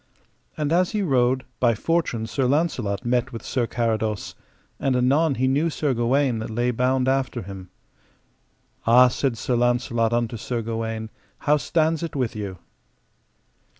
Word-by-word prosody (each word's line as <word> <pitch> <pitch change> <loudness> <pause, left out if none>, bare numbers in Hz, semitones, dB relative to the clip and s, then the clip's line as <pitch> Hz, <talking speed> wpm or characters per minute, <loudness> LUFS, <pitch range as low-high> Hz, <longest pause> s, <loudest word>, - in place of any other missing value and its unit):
And 150 0 0
as 180 +4 +2
he 210 -1 0
rode, 130 -4 +2
by 120 -2 +3
fortune 140 -4 -1
Sir 130 +4 -1
Launcelot 125 -7 0
met 125 +2 +1
with 115 - -7
Sir 120 -3 -1
Carados, 110 -3 -1 0.5
and 135 -2 +1
anon 140 +4 +3
he 130 +1 +1
knew 145 +5 +2
Sir 150 -3 -1
Gawaine 125 +1 +1
that 110 - -5
lay 120 +2 0
bound 125 +2 +1
after 135 -5 0
him. 95 -1 -9 1.2
Ah, 125 +2 +7
said 125 -1 -1
Sir 125 +3 -1
Launcelot 120 -1 +1
unto 120 0 -1
Sir 115 +2 -3
Gawaine, 115 -1 -4 0.3
how 150 +1 +4
stands 160 +2 +1
it 165 -3 -5
with 125 -5 -1
you? 100 -3 -5
125 Hz, 150 wpm, -23 LUFS, 115-140 Hz, 1.2 s, Ah